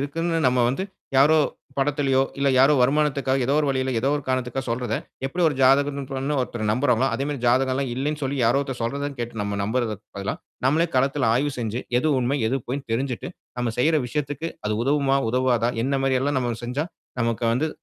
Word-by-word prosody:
இருக்குன்னு 165 Hz, +4 st, -1 dB
நம்ம 125 Hz, -1 st, +2 dB
வந்து 135 Hz, +10 st, -1 dB, 0.3 s
யாரோ 150 Hz, +4 st, +6 dB, 0.4 s
படத்திலேயோ! 135 Hz, -1 st, +2 dB, 0.2 s
இல்ல 140 Hz, 0 st, +2 dB
யாரோ 135 Hz, +3 st, +6 dB
வருமானத்துக்காக 135 Hz, -1 st, +1 dB
ஏதோ 140 Hz, -, +2 dB
ஒரு 150 Hz, -, 0 dB
வழியில, 130 Hz, -1 st, 0 dB
ஏதோ 135 Hz, -, +1 dB
ஒரு 145 Hz, -, -5 dB
காரணத்துக்காக 130 Hz, 0 st, -1 dB
சொல்றத, 120 Hz, -1 st, -1 dB, 0.3 s
எப்பிடி 175 Hz, +7 st, -2 dB
ஒரு 150 Hz, -, -2 dB
ஜாதகம்ன்னு 140 Hz, +1 st, +3 dB
சொன்னன்னோ 135 Hz, +2 st, -1 dB
ஒருத்தர் 120 Hz, -3 st, -4 dB
நம்புறாங்களோ! 125 Hz, 0 st, +2 dB
அதேமாரி 140 Hz, 0 st, -2 dB
ஜாதகம்லாம் 130 Hz, +2 st, +2 dB
இல்லன்னு 150 Hz, +4 st, -2 dB
சொல்லி 140 Hz, +1 st, -1 dB
யாரோ 120 Hz, +4 st, +3 dB
ஒருத்தர் 135 Hz, -3 st, -5 dB
சொல்றத 140 Hz, +5 st, -2 dB
கேட்டு 120 Hz, -1 st, -5 dB
நம்ம 100 Hz, 0 st, -3 dB
நம்புறதுக்கு 110 Hz, -1 st, -2 dB
பதிலா, 100 Hz, 0 st, -2 dB, 0.3 s
நம்மளே 160 Hz, +6 st, +3 dB
களத்தில 135 Hz, -1 st, +2 dB
ஆய்வு 145 Hz, +3 st, +1 dB
செஞ்சி 115 Hz, 0 st, -2 dB, 0.2 s
எது 155 Hz, -, +1 dB
உண்மை? 130 Hz, +4 st, 0 dB
எது 130 Hz, -, +1 dB
பொய்ன்னு 135 Hz, +1 st, -4 dB
தெரிஞ்சிட்டு, 130 Hz, +6 st, -2 dB, 0.3 s
நம்ம 120 Hz, -2 st, -1 dB
செய்யிற 155 Hz, +5 st, +3 dB
விஷயத்திக்கு 145 Hz, +4 st, -3 dB, 0.2 s
அது 105 Hz, -, 0 dB
உதவுமா? 140 Hz, -1 st, +2 dB
உதவாதா? 125 Hz, -1 st, +2 dB
என்னமாரி 135 Hz, -1 st, +1 dB
எல்லாம் 145 Hz, +1 st, 0 dB
நம்ம 120 Hz, -2 st, -1 dB
செஞ்சா, 130 Hz, +6 st, -2 dB, 0.4 s
நமக்கு 115 Hz, 0 st, 0 dB
வந்து 145 Hz, +7 st, +1 dB
135 Hz, 180 wpm, -24 LUFS, 125-145 Hz, 0.4 s, யாரோ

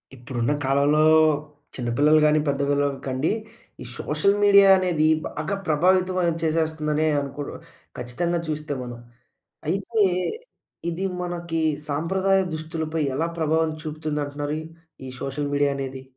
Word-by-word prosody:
ఇప్పుడున్న 120 Hz, 0 st, -2 dB
కాలంలో 140 Hz, +3 st, +3 dB, 0.8 s
చిన్నపిల్లలు 140 Hz, +6 st, +3 dB
కాని, 150 Hz, 0 st, +4 dB
పెద్ద 140 Hz, 0 st, 0 dB
పిల్లలు 145 Hz, -1 st, +1 dB
కండి, 130 Hz, +3 st, 0 dB, 0.5 s
ఈ -, -, -10 dB
సోషల్ 155 Hz, +7 st, +1 dB
మీడియా 200 Hz, -1 st, +7 dB
అనేది 175 Hz, -4 st, +1 dB, 0.2 s
బాగా 155 Hz, +7 st, -3 dB
ప్రభావితమయం 180 Hz, +2 st, +2 dB
చేసేస్తుందనే 155 Hz, -1 st, 0 dB
అనుకో 140 Hz, +1 st, -5 dB, 0.6 s
ఖచ్చితంగా 170 Hz, +9 st, -2 dB
చూస్తే 150 Hz, -1 st, -3 dB
మనం. 120 Hz, -1 st, -8 dB, 0.7 s
అయితే 200 Hz, +5 st, +1 dB, 0.9 s
ఇది 170 Hz, +3 st, -4 dB, 0.2 s
మనకి 170 Hz, -2 st, -3 dB, 0.3 s
సాంప్రదాయ 190 Hz, +6 st, +1 dB
దుస్తులపై 160 Hz, 0 st, -3 dB
ఎలా 165 Hz, +4 st, 0 dB
ప్రభావం 160 Hz, 0 st, +1 dB
చూపుతుందంటున్నారు, 150 Hz, -1 st, -3 dB, 0.5 s
ఈ -, -, -6 dB
సోషల్ 145 Hz, +1 st, -3 dB
మీడియా 145 Hz, 0 st, +2 dB
అనేది? 135 Hz, -1 st, -5 dB
155 Hz, 110 wpm, -24 LUFS, 145-170 Hz, 0.9 s, మీడియా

